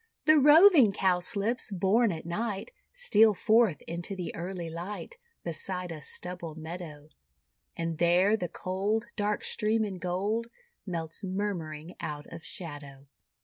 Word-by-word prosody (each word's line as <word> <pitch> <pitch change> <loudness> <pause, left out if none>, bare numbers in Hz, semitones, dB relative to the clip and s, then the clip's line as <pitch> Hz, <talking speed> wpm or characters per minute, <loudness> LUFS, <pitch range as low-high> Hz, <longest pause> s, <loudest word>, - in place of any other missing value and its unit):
The 310 0 +7
Roving 295 - +7
Cowslips, 200 +6 0
born 200 +4 +2
at 160 -2 -6
night, 210 - -3 0.2
Steal 225 - +4
forth 220 -4 +3
into 170 +4 -4
the 180 -2 -5
early 175 0 -5
light, 180 - -6 0.3
Beside 180 +2 -3
a 155 -2 -7
stubble 170 +1 -6
meadow; 160 -2 -8 0.7
And 165 -1 -3
there 180 +5 +4
the 180 -6 -3
cold 200 +7 -1
Dark 210 -1 -1
stream 220 0 +1
in 190 -3 -5
gold, 200 +6 -1 0.4
Melts 165 +1 -4
murmuring 180 -5 -3
out 150 -1 -5
of 165 -1 -9
shadow. 145 -5 -8
185 Hz, 130 wpm, -29 LUFS, 165-215 Hz, 0.7 s, The